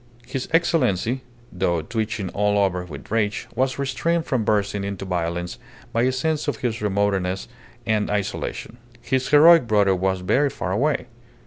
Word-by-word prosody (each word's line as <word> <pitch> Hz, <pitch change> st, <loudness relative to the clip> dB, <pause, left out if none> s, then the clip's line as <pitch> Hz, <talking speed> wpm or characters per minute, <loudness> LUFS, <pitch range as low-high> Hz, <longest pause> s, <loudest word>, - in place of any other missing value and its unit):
His 130 Hz, +1 st, -4 dB
Excellency, 130 Hz, -, +1 dB, 0.3 s
though 85 Hz, -3 st, 0 dB
twitching 110 Hz, 0 st, -3 dB
all 105 Hz, +1 st, +1 dB
over 95 Hz, -3 st, +1 dB
with 75 Hz, -2 st, -10 dB
rage, 105 Hz, -2 st, 0 dB
was 130 Hz, +2 st, 0 dB
restrained 150 Hz, +5 st, 0 dB
from 130 Hz, -5 st, 0 dB
bursting 100 Hz, -1 st, 0 dB
into 100 Hz, -1 st, -4 dB
violence 85 Hz, -1 st, -3 dB, 0.3 s
by 115 Hz, -, +2 dB
a 130 Hz, +2 st, +3 dB
sense 155 Hz, +4 st, -1 dB
of 145 Hz, -, -1 dB
his 115 Hz, -3 st, -2 dB
remoteness 100 Hz, -2 st, 0 dB, 0.4 s
and 110 Hz, -2 st, +1 dB
isolation. 105 Hz, +3 st, -3 dB, 0.2 s
His 130 Hz, +2 st, -1 dB
heroic 155 Hz, -1 st, +7 dB
brother 100 Hz, -3 st, +3 dB
was 95 Hz, 0 st, 0 dB
very 130 Hz, +10 st, +2 dB
far 90 Hz, -8 st, -4 dB
away. 140 Hz, +10 st, +1 dB
105 Hz, 150 wpm, -23 LUFS, 95-130 Hz, 0.4 s, heroic